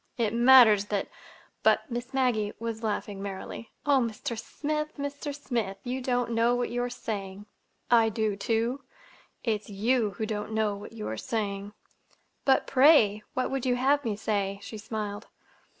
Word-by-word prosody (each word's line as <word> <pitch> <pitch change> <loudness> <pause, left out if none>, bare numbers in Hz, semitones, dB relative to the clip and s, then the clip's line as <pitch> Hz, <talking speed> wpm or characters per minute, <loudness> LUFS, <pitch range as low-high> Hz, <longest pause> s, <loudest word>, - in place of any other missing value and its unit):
It 225 -3 0
matters 235 -4 +7
that—" 205 -1 -2 0.5
But - - +4
Miss 240 +2 -4
Maggie 245 -6 +1
was 230 -1 -4
laughing 205 -2 -3
merrily. 200 +3 -6 0.2
"Oh, 285 -2 +4
Mr. 235 0 -3
Smith, 300 +7 -4
Mr. 285 +1 -4
Smith, 230 -9 -3
you 255 +1 -3
don't 245 -2 0
know 230 +1 +3
what 245 0 -1
you 245 0 -1
are 245 - -1
saying!" 205 -4 -5 0.5
"I 230 -2 +6
do, 215 -1 -1
too. 230 +6 -1 0.6
It's 215 -3 -1
you 215 +1 +1
who 220 - -1
don't 215 0 -4
know 215 -2 +1
what 205 +2 -10
you 220 -2 -6
are 110 - -4
saying!" 200 - -3 0.7
"But, 265 -1 +4
pray, 255 -7 +5
what 255 - 0
would 270 -2 -2
you 250 -1 +2
have 280 +3 +2
me 220 -4 -1
say?" 200 -2 -1
she 220 - -7
smiled. 210 -1 -5
225 Hz, 165 wpm, -28 LUFS, 210-250 Hz, 0.7 s, matters